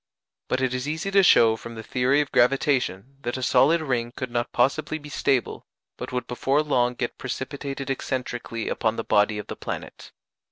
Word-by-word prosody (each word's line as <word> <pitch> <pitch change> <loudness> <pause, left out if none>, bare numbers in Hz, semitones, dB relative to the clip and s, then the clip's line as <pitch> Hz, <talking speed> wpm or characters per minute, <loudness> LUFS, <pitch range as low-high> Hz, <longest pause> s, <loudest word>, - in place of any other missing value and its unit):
But 130 - 0
it 130 -1 0
is 130 +2 -3
easy 160 +6 -2
to 195 0 +6
show 115 -11 +6
from 115 +1 -9
the 110 - -7
theory 130 +5 +2
of 145 - -4
gravitation, 135 -2 +1
that 120 0 -3
a 130 - -4
solid 160 +7 +4
ring 125 -5 -1
could 130 -2 -5
not 120 0 -1
possibly 140 +5 +1
be 150 -1 -11
stable, 135 -3 0 0.3
but - - -7
would 125 0 -2
before 135 +4 +1
long 125 -4 +1
get 120 -1 -4
precipitated 135 +1 -5
excentrically 125 -3 -3
upon 110 0 0
the 115 - -3
body 105 +1 +2
of 105 - -5
the - - -6
planet. - - -7
130 Hz, 190 wpm, -25 LUFS, 120-140 Hz, 0.3 s, to